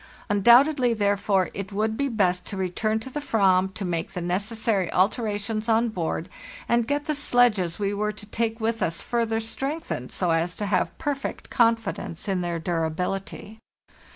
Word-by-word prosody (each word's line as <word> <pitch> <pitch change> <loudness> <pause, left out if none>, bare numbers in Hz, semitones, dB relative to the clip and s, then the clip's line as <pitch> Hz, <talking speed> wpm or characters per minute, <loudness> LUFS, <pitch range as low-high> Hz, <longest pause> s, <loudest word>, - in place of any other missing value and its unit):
Undoubtedly, 245 +4 +5
there 205 -1 +2
fore, 195 -2 +1
it 200 0 -6
would 215 +2 0
be 280 +4 0
best 185 -7 +1
to 200 - -6
return 215 +4 -1
to 220 - -8
the 295 - -3
/vam 190 -8 +2
to 190 +1 -4
make 175 +1 -3
the 180 - -3
necessary 200 +1 -1
alterations 215 +2 0
on 230 +1 +3
board, 170 -4 -3 0.4
and 235 -1 +2
get 290 +1 -1
the 305 - 0
sledges 240 - +2
we 200 -1 -1
were 210 +1 -1
to 210 0 -11
take 225 +1 -2
with 225 0 -1
us 165 0 0
further 230 -2 0
strengthened, 265 - -4
so 180 -3 0
as 165 +2 0
to 210 - -3
have - - 0
perfect 285 -3 -4
confidence 225 -6 0
in 190 -2 0
their 175 -1 -2
durability. 180 +6 -3
210 Hz, 170 wpm, -25 LUFS, 185-230 Hz, 0.4 s, Undoubtedly